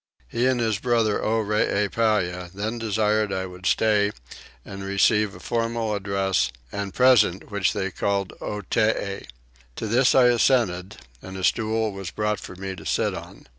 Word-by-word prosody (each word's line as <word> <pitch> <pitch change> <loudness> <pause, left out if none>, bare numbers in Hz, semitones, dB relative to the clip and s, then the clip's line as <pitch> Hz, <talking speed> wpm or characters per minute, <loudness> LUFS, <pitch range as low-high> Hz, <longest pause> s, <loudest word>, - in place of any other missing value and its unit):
He 120 - 0
and 130 -1 +1
his 110 -4 0
brother 115 -3 +1
Oreepyah 105 -3 0
then 110 +4 -3
desired 110 -1 +1
I 95 0 -2
would 90 0 -6
stay 105 -2 +3 0.5
and 100 0 -8
receive 100 +1 +2
a - - -11
formal 115 +1 -1
address 95 -7 0 0.2
and 100 -1 -4
present 110 -7 +3
which 100 -2 +1
they 95 -2 -2
called 100 0 -1
Otee. 105 0 -1 0.5
To - - -4
this 125 +4 +3
I 130 - +7
assented 110 -6 +1 0.2
and 95 0 -8
a 95 - -6
stool 110 +2 +1
was 95 -2 -6
brought 105 +2 -1
for 95 - -9
me 95 +1 -5
to - - -10
sit - - 0
on. - - -10
105 Hz, 155 wpm, -24 LUFS, 95-110 Hz, 0.5 s, I